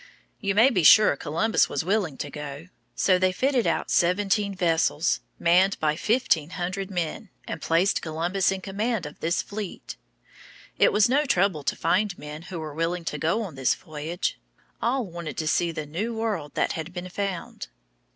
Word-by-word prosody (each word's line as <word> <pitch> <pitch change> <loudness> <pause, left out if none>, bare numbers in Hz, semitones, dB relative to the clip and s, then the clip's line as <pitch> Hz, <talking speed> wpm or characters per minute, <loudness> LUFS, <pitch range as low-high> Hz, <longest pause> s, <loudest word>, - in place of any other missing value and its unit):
You 200 -2 -1
may 235 +6 +6
be 190 -7 +2
sure 210 +2 +7
Columbus 165 +11 +1
was 145 - -2
willing 185 -7 0
to 145 - -5
go. 150 +3 -7 0.3
So 185 -2 +3
they 185 0 +3
fitted 255 +4 +1
out - - -1
seventeen 200 +3 +2
vessels, 165 - +1 0.2
manned 185 +3 +3
by 155 -1 +1
fifteen 180 - +1
hundred 185 +2 -3
men, 180 +3 -3 0.2
and - - -5
placed 170 +5 +2
Columbus 175 +5 0
in 190 -1 -3
command 205 0 -2
of 150 - -9
this 170 +2 0
fleet. 205 - -7 0.8
It - - +5
was 210 +2 +4
no 285 +5 +2
trouble 190 - +2
to - - -1
find 180 +3 +1
men 150 +1 -8
who 180 -1 -7
were 155 -2 -6
willing 165 +2 -2
to 150 - -3
go 165 +10 +1
on 190 -7 -7
this 135 -2 +1
voyage. 160 +2 -4 0.4
All 250 +1 0
wanted 170 -3 -7
to 155 - -2
see 170 +2 +2
the 155 -2 -5
new 200 +11 -3
world 205 -10 -3
that - - +1
had 160 +2 -5
been 180 0 -6
found. 195 -2 -4
180 Hz, 180 wpm, -25 LUFS, 160-205 Hz, 0.8 s, sure